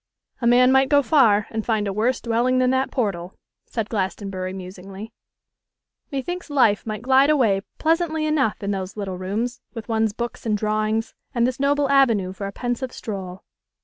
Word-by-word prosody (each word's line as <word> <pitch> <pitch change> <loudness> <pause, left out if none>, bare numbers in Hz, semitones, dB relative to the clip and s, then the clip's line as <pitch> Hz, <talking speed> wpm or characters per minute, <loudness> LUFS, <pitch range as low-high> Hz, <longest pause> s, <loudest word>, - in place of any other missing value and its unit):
'A 235 - +1
man 250 +2 +6
might 265 0 +4
go 285 -1 +4
far, 225 -9 +4
and 220 -1 -2
find 215 -2 0
a 195 - -2
worse 230 +6 +1
dwelling 240 +2 +1
than 255 0 +3
that 260 +1 +1
portal,' 190 -7 -2 0.3
said 225 -3 -3
Glastonbury, 190 -2 -3
musingly. 190 +3 -9 1.0
'Me 270 -2 -3
thinks 355 +1 -5
life 230 -8 +2
might 215 0 -4
glide 265 +2 +4
away 230 -10 +3 0.2
pleasantly 320 -1 +1
enough 280 -10 0
in 200 - -1
those 190 0 -4
little 190 -3 -4
rooms, 220 +7 -3
with 225 -2 -7
one's 220 -2 +1
books 235 +2 -5
and 215 -2 0
drawings, 215 +1 -1 0.2
and 235 0 +3
this 255 +1 -2
noble 285 +1 +2
avenue 230 -9 +3
for 200 +1 -5
a - - -5
pensive 245 +3 -3
stroll. 190 -4 -7
225 Hz, 180 wpm, -23 LUFS, 200-260 Hz, 1.0 s, man